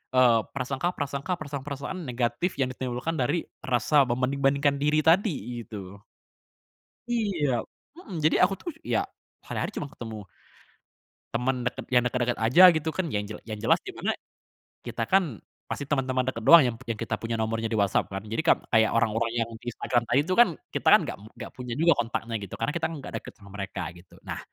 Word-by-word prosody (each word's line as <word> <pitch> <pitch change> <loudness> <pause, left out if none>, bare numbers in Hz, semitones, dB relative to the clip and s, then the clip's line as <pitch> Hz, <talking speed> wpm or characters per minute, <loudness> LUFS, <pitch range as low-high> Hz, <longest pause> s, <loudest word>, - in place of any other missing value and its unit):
eee, 120 -3 +6
prasangka-prasangka, 140 +3 -2
perasaan-perasaan 145 +4 -5
negatif 125 - -1
yang 130 - +1
ditimbulkan 130 +6 -3
dari 145 +7 0 0.2
rasa 135 +3 +3
membanding 130 +3 -1
bandingkan 140 +1 +3
diri 150 +1 +3
tadi, 160 - +2
gitu. 100 -2 -9 1.1
Iya 175 - 0 0.3
mhm, 200 - -7
jadi 155 +1 +3
aku 195 - +4
tuh 345 - -5
ya, - - 0 0.4
hari - - -4
hari - - -2
cuma 145 - -3
ketemu 110 -6 -8 1.1
teman 125 +2 +1
deket - - -3
yang 125 -1 +4
deket-deket 120 0 0
aja 150 +11 +7
gitu 160 -2 0
kan, 190 - -1
yang 105 -3 -1
jel 105 +1 -8
yang 105 - -4
jelas - - +2
di - - -9
mana - - 0 0.7
kita 115 - -3
kan 175 - +2 0.3
pasti 145 - -3
teman-teman 130 -2 0
deket 115 -3 -3
doang 165 +4 +9
yang 120 - -1 0.2
kita 115 - -2
punya 115 0 -3
nomornya 115 0 -1
di 110 - 0
WhatsApp 100 -1 +1
kan. 95 0 -4
Jadi 115 +9 -2
kan, 165 - +4
kayak 110 -2 +4
orang-orang 115 0 +1
yang 115 0 0
di 120 +1 -6
Instagram 120 +1 0
tadi 130 +4 +3
itu 185 - +1
kan, 240 -4 +7 0.3
kita - - -2
kan - - +8
enggak - - -5
mu 110 - -13
enggak - - -7
punya 125 -2 -6
juga 170 +1 +5
kontaknya 115 0 -4
gitu, 100 - -7
karena 150 - -1
kita 165 -1 0
enggak 145 -5 -7
deket - - -10
sama 100 -1 -15
mereka 100 -1 -4
gitu. 85 0 -17
Nah, - - -4
130 Hz, 185 wpm, -27 LUFS, 115-150 Hz, 1.1 s, doang